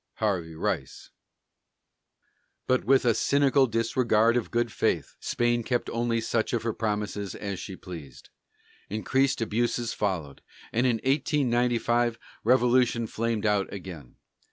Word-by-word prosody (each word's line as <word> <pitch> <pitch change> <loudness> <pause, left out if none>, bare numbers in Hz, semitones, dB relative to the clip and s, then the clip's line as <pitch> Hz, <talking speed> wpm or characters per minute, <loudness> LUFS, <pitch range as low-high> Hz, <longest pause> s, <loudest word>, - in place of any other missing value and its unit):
HARVEY 90 -7 -1
RICE. - - -3 1.5
But 130 0 +1
with 135 0 +4
a 120 - +5
cynical 140 +1 +3
disregard 115 0 +2
of 120 - -1
good 120 -1 0
faith, - - -1
Spain 120 0 0
kept 120 +1 -2
only 115 0 0
such 115 +1 -1
of 115 - 0
her 115 -1 -1
promises 105 -2 -3
as 100 -3 -5
she 95 - -7
pleased; 80 -9 -11 0.6
increased 130 +6 +1
abuses 115 +1 0
followed, 85 -9 -3 0.3
and 120 +3 +2
in 120 - +2
1895 120 -4 +1 0.3
revolution 125 -1 +3
flamed 115 -1 -2
out 105 -2 +1
again. 90 -9 -9
115 Hz, 125 wpm, -27 LUFS, 105-120 Hz, 1.5 s, a